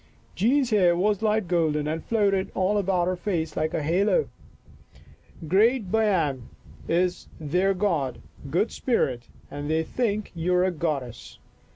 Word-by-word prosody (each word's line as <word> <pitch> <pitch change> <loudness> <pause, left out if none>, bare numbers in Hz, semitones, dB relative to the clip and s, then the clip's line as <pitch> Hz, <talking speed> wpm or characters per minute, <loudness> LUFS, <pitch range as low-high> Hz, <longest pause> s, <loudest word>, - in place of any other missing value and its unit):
Jean's 255 +4 +2
hair 180 -5 +4
was 205 +2 +1
light 215 -3 +1
golden 155 -4 +1
and 160 +1 -3
floated 200 -4 +1
all 195 +3 +1
about 185 -3 +1
her 185 +1 0
face 170 -5 -3
like 155 0 -1
a 155 - -1
halo. 195 - +1 0.6
" 160 - -17
Great 210 - +2
Baiame 185 - +1 0.5
is 180 +1 0
their 180 +6 +1
god, 165 -10 -1 0.3
good 175 +9 0
spirit, 130 - -1 0.2
and 145 +1 -5
they 160 +1 +1
think 215 +1 -2
you 175 +1 0
are 180 - +3
a 185 - +1
goddess. 145 -8 -4
180 Hz, 150 wpm, -25 LUFS, 160-205 Hz, 0.6 s, hair